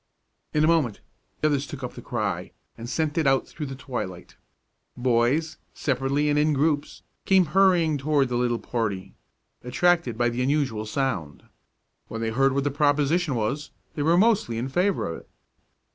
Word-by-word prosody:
In 150 Hz, -, +2 dB
a -, -, +4 dB
moment 155 Hz, -10 st, +2 dB, 0.4 s
others 145 Hz, -2 st, +1 dB
took 145 Hz, -5 st, -8 dB
up 125 Hz, -, -5 dB
the -, -, -9 dB
cry, -, -, -3 dB, 0.2 s
and 115 Hz, +1 st, -8 dB
sent 155 Hz, +2 st, 0 dB
it 155 Hz, -, +1 dB
out 135 Hz, 0 st, +2 dB
through 150 Hz, -2 st, -6 dB
the 135 Hz, -, -6 dB
twilight. 120 Hz, -10 st, -6 dB, 0.6 s
Boys, 125 Hz, +6 st, +1 dB, 0.2 s
separately 140 Hz, +2 st, 0 dB
and 145 Hz, 0 st, +2 dB
in 150 Hz, +1 st, +3 dB
groups, 145 Hz, +1 st, 0 dB, 0.2 s
came 190 Hz, -2 st, +4 dB
hurrying 175 Hz, -6 st, +4 dB
toward 145 Hz, -1 st, +2 dB
the 125 Hz, -, -2 dB
little 120 Hz, -1 st, +1 dB
party, 110 Hz, -6 st, -3 dB, 0.5 s
attracted 135 Hz, -1 st, +1 dB
by 120 Hz, 0 st, +2 dB
the 120 Hz, +1 st, -3 dB
unusual 130 Hz, -6 st, 0 dB
sound. 105 Hz, -, -2 dB, 0.6 s
When 115 Hz, -, -6 dB
they 115 Hz, 0 st, -1 dB
heard 135 Hz, +3 st, +2 dB
what 140 Hz, 0 st, 0 dB
the 145 Hz, -, 0 dB
proposition 145 Hz, +2 st, +2 dB
was, 120 Hz, +7 st, -2 dB, 0.2 s
they 150 Hz, -, -4 dB
were 165 Hz, +4 st, +3 dB
mostly 205 Hz, -, +2 dB
in 125 Hz, +3 st, -2 dB
favor 180 Hz, +6 st, +1 dB
of 85 Hz, -, -5 dB
it. -, -, -22 dB
140 Hz, 170 wpm, -25 LUFS, 120-155 Hz, 0.6 s, a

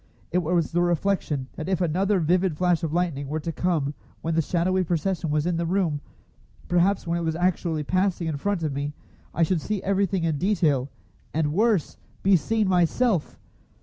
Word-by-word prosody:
It 180 Hz, -, +2 dB
was 170 Hz, -1 st, 0 dB
the 175 Hz, +1 st, +2 dB
reflection 175 Hz, -5 st, 0 dB
that 155 Hz, -, -4 dB
if 190 Hz, -3 st, +1 dB
another 185 Hz, +4 st, +1 dB
vivid 175 Hz, 0 st, +1 dB
flash 180 Hz, -1 st, +2 dB
of 160 Hz, -, -2 dB
lightning 160 Hz, -5 st, -1 dB
were 155 Hz, +3 st, -2 dB
to 165 Hz, -, -3 dB
come 155 Hz, -4 st, 0 dB, 0.3 s
when 165 Hz, -, -1 dB
the 165 Hz, -, +3 dB
shadowy 185 Hz, +4 st, +1 dB
procession 175 Hz, 0 st, -1 dB
was 150 Hz, +1 st, +1 dB
in 175 Hz, -1 st, 0 dB
the 170 Hz, -, -1 dB
room, 170 Hz, -5 st, 0 dB, 0.7 s
perhaps 180 Hz, +3 st, +2 dB
when 170 Hz, 0 st, 0 dB
it -, -, -3 dB
was 160 Hz, -1 st, -1 dB
actually 170 Hz, -3 st, 0 dB
passing 185 Hz, +2 st, 0 dB
in 155 Hz, -3 st, -2 dB
front 200 Hz, +2 st, -1 dB
of 150 Hz, -3 st, -1 dB
me, 140 Hz, +1 st, -3 dB, 0.4 s
I 170 Hz, -, +1 dB
should 165 Hz, 0 st, +1 dB
see 210 Hz, +2 st, -3 dB
everything 195 Hz, -2 st, +1 dB
in 160 Hz, -3 st, 0 dB
detail, 155 Hz, -9 st, +1 dB, 0.5 s
and 150 Hz, -2 st, +1 dB
worse, 210 Hz, -3 st, +1 dB, 0.3 s
be 195 Hz, 0 st, +5 dB
seen 215 Hz, +6 st, +1 dB
myself! 180 Hz, +1 st, +1 dB
170 Hz, 185 wpm, -25 LUFS, 155-185 Hz, 0.7 s, be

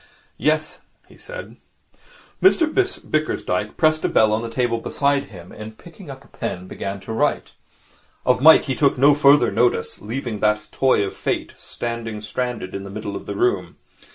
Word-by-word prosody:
'Yes,' -, -, 0 dB, 0.3 s
he -, -, -18 dB
said. -, -, -10 dB, 0.8 s
Mr 375 Hz, -3 st, +5 dB, 0.4 s
Bickersdyke 105 Hz, -10 st, -1 dB
pressed 155 Hz, -1 st, +2 dB
a -, -, +1 dB
bell 110 Hz, -1 st, +3 dB
on 110 Hz, -, 0 dB
the 115 Hz, -, -5 dB
table 115 Hz, -1 st, 0 dB
beside 140 Hz, +3 st, 0 dB
him, 90 Hz, -3 st, -13 dB
and 110 Hz, 0 st, -10 dB
picking -, -, -14 dB
up -, -, -9 dB
a -, -, -20 dB
pen, 90 Hz, 0 st, -5 dB
began 100 Hz, +1 st, -5 dB
to 110 Hz, -, -6 dB
write. 110 Hz, -, 0 dB, 0.7 s
Of 125 Hz, 0 st, +2 dB
Mike 160 Hz, +3 st, +8 dB
he 135 Hz, -, -2 dB
took 140 Hz, +1 st, +2 dB
no 140 Hz, +3 st, +6 dB
further 140 Hz, -3 st, +5 dB
notice, 120 Hz, -7 st, 0 dB
leaving 115 Hz, 0 st, -4 dB
that 105 Hz, 0 st, 0 dB
toy 130 Hz, -6 st, +2 dB
of 95 Hz, -, -6 dB
Fate -, -, -3 dB
standing 115 Hz, -2 st, -5 dB
stranded 115 Hz, -2 st, -4 dB
in 100 Hz, -, -5 dB
the 100 Hz, -, -8 dB
middle 100 Hz, 0 st, -6 dB
of -, -, -8 dB
the -, -, -4 dB
room. 370 Hz, +1 st, 0 dB
115 Hz, 175 wpm, -21 LUFS, 105-140 Hz, 0.8 s, Mike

